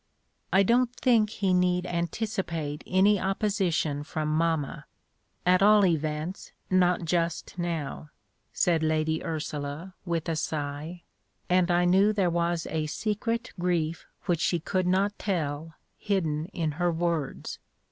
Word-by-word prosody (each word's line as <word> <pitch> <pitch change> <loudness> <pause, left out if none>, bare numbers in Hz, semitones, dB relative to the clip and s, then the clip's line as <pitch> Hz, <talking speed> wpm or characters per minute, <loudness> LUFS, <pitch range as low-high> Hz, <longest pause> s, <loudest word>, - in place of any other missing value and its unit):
"I 195 +1 +5
don't 240 +4 +3
think 230 -5 +3
he 195 -3 0
need 180 0 +2
anticipate 170 -4 -3
any 195 +2 +4
opposition 190 -7 0
from 155 0 -3
mamma, 160 -3 0 0.6
at 180 +1 +4
all 210 0 +6
events 160 +1 -2 0.2
not 180 -1 +3
just 170 +1 -1
now," 160 -3 -3 0.4
said 170 -4 +2
Lady 160 0 0
Ursula, 155 +2 -4
with 170 -3 -2
a 165 - 0
sigh, 155 +2 -4 0.5
and 180 0 +4
I 175 0 +3
knew 195 +4 +4
there 190 -4 +1
was 170 -1 0
a 155 -1 -1
secret 225 +6 -2
grief 170 -2 -1 0.2
which 175 -4 +1
she 175 - +1
could 185 +2 -1
not 195 +3 +1
tell 160 -4 -2 0.2
hidden 160 -7 0
in 160 -4 -2
her 175 0 +3
words. 165 -3 -2
175 Hz, 130 wpm, -27 LUFS, 155-190 Hz, 0.6 s, all